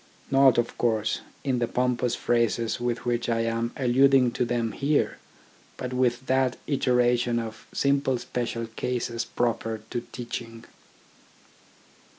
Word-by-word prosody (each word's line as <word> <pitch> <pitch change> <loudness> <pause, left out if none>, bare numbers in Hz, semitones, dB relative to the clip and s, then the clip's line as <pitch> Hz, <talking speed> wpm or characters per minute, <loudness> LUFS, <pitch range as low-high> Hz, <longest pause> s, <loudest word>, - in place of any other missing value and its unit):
Not, 135 -2 +6
of 120 -1 -1
course, 110 -2 +1 0.2
in 130 -3 0
the 120 - +1
pompous 125 0 0
phrases 115 -1 0
with 120 0 -2
which 120 0 0
I 115 -1 +1
am 115 +1 -1
alluding 130 0 +4
to 125 - 0
them 120 -2 -1
here, 145 +1 0 0.6
but 125 0 -4
with 125 0 +1
that 130 -1 +1
iteration 125 -3 +2
of 115 -1 -5
simple 140 -2 +1
special 120 -1 -3
cases 120 +1 -3
proper 115 -2 -1
to 120 - -2
teaching. 115 -2 -6
120 Hz, 130 wpm, -26 LUFS, 115-125 Hz, 0.6 s, Not